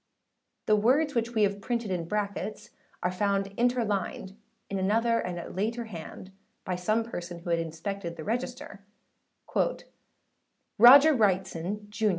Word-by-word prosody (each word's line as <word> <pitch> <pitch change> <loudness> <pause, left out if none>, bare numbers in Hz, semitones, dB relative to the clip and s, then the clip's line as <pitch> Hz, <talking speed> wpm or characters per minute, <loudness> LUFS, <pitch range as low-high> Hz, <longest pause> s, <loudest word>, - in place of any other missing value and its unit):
The 215 - +4
words 270 +8 +2
which 235 0 -1
we 215 - +3
have 200 0 0
printed 235 -2 -2
in 170 -3 -2
brackets 205 +1 -4 0.3
are 180 - +1
found 195 +1 -1
interlined 215 -5 -1 0.3
in 195 - -3
another 230 +4 +2
and 180 -1 -4
a 170 - -6
later 230 +5 -2
hand 185 -1 -9 0.3
by 185 - -2
some 215 +6 0
person 175 -6 -7
who 170 0 -5
had 170 - +2
inspected 170 +2 -5
the 160 - -8
register:â 240 -1 -4 2.0
âRo_d_ger 275 +6 +9
Wrightson, 190 0 0
Jun. 215 0 +1
205 Hz, 140 wpm, -28 LUFS, 185-230 Hz, 2.0 s, âRo_d_ger